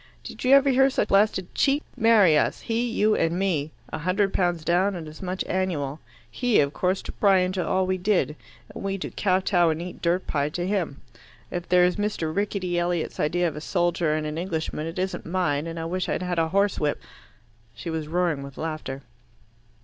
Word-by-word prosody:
Did - - -8
you 260 +2 +6
ever 275 0 +5
hear 265 +1 +5
such 270 - -1
blasted 195 -2 +2
cheek? 285 +1 +2
Marry 215 -8 +5
us 150 - +1
he, 235 +1 -1
you, 215 -2 +2
and 165 +1 +1
me 170 -6 0 0.2
a - - -2
hundred 190 +4 +1
pounds 175 -3 0
down 185 +4 +2
and 165 -3 -6
as 155 +1 -11
much 185 0 -3
annual 160 -6 -2 0.3
he, 245 - +2
of 140 0 +2
course, 185 +1 0
to - - -6
pry 195 -2 +3
into 185 0 0
all 185 0 +1
we 185 0 -1
did, 180 -5 +1 0.4
and - - -7
we 195 0 -1
to 195 - -5
kowtow 185 -3 +2
and 160 0 -1
eat 175 +1 -7
dirt 175 +2 +1
pie 145 0 0
to 175 +3 -3
him. 185 -8 -2 0.5
If 175 -1 -5
that's 180 +1 +4
Mr. 205 -7 -2
Rickety 195 -3 -1
Elliot's 175 -1 -2
idea 175 +4 +1
of 160 - -4
a 150 - -6
soldier 175 -2 0
and 155 0 -2
an 150 +1 -3
Englishman, 160 -3 -3
it 165 - -7
isn't 185 +1 -2
mine, 165 -4 -1
and 165 0 -5
I 165 - -3
wish 180 +2 -2
I'd - - -1
had 180 -2 -1
a 165 - +2
horse 200 +3 +1
whip." 150 -1 0 0.8
She 165 - -6
was 160 -2 -3
roaring 170 -3 0
with 140 -1 -10
laughter. 155 -4 -5
180 Hz, 205 wpm, -25 LUFS, 160-195 Hz, 0.8 s, you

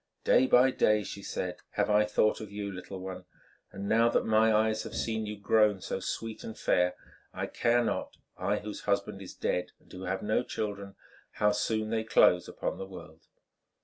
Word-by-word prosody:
"Day 130 - +4
by 130 +1 +5
day," 105 -4 +3
she 100 - -7
said, 90 -2 -4 0.2
"have - - +1
I 105 0 +5
thought 105 +1 +1
of 105 -2 -8
you, 100 -1 -4
little 95 +1 -8
one, 90 -1 -7 0.5
and 100 +1 -6
now 115 +2 +4
that - - +1
my 110 0 +4
eyes 110 0 +2
have - - -7
seen 110 -1 -2
you 105 0 -5
grown 105 0 +3
so - - -4
sweet 115 -1 -5
and 110 - -7
fair, 90 0 +2 0.4
I - - -2
care 120 +1 +2
not—I 105 -2 -3
whose 105 0 -6
husband - - 0
is - - -9
dead 90 - -2
and - - -20
who 95 +1 -7
have 95 +1 -2
no 105 +2 +1
children—how 105 -1 -3
soon 110 +1 -1
they 110 -1 0
close 90 -5 +4
upon - - -4
the 95 - -5
world." 85 -4 -12
105 Hz, 185 wpm, -30 LUFS, 95-110 Hz, 0.5 s, by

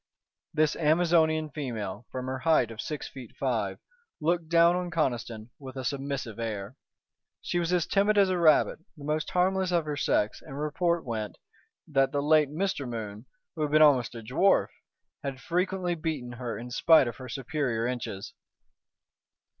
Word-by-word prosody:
This 155 -1 +2
Amazonian 160 -1 +3
female, 115 -7 -5
from 130 0 -4
her 130 0 -3
height 155 -7 +3
of 110 - -5
six 150 -2 -5
feet 125 -4 -11
five, 110 -7 -1 0.4
looked 170 0 0
down 170 +1 +5
on 180 0 -2
Conniston 120 -8 -2
with 135 -2 -9
a 130 -1 -5
submissive 135 -5 -3
air. 110 0 -4 0.7
She 175 - -1
was 170 0 -1
as 175 -3 +2
timid 205 +2 +2
as 200 -1 +6
a 185 -1 0
rabbit, 155 -2 +4 0.2
the 145 - -11
most 150 +1 -1
harmless 185 +1 +1
of 170 -3 +2
her 150 -1 -2
sex, 105 -6 0
and 135 +1 -8
report 170 +2 0
went, 110 -3 -4 0.5
that 135 -3 +2
the 145 -1 -1
late 155 -1 +4
Mr. 150 -4 -2
Moon, 110 -1 -6 0.3
who 160 - -5
had 150 - +1
been 155 +1 +6
almost 130 -6 +4
a 115 - -7
dwarf, 135 - +3 0.5
had 135 -2 -5
frequently 180 +4 -1
beaten 155 -7 -3
her 120 -1 -5
in 120 +1 -8
spite 155 +1 +5
of 120 - -5
her 130 -1 -9
superior 125 -3 -2
inches. 115 -5 -4
145 Hz, 170 wpm, -28 LUFS, 120-165 Hz, 0.7 s, as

